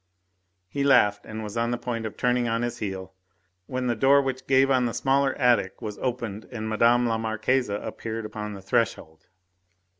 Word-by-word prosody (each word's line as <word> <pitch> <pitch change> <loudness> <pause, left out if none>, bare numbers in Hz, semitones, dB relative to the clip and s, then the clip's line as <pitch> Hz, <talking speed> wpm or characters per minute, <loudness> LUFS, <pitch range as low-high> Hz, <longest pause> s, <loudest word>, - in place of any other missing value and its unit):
He 140 +9 -2
laughed, 105 -7 +4
and 110 0 -6
was 105 +1 -7
on 115 0 0
the 120 - -1
point 115 -2 -3
of 110 - -10
turning 125 -1 +1
on 115 +1 0
his 120 0 -3
heel 95 -3 -5 0.5
when 130 0 -3
the 120 - +1
door 135 +5 +5
which 130 -1 -3
gave 135 +1 +4
on 130 -2 +3
the 115 - -4
smaller 135 0 +2
attic 120 -7 +2
was 105 -3 -6
opened 115 -5 -3
and 110 -3 -4
Mme. 115 +3 +3
la 115 -1 0
Marquise 110 +3 0
appeared 110 +2 -4
upon 105 -1 -6
the 95 - -11
threshold. 80 -7 -1
115 Hz, 185 wpm, -26 LUFS, 110-125 Hz, 0.5 s, door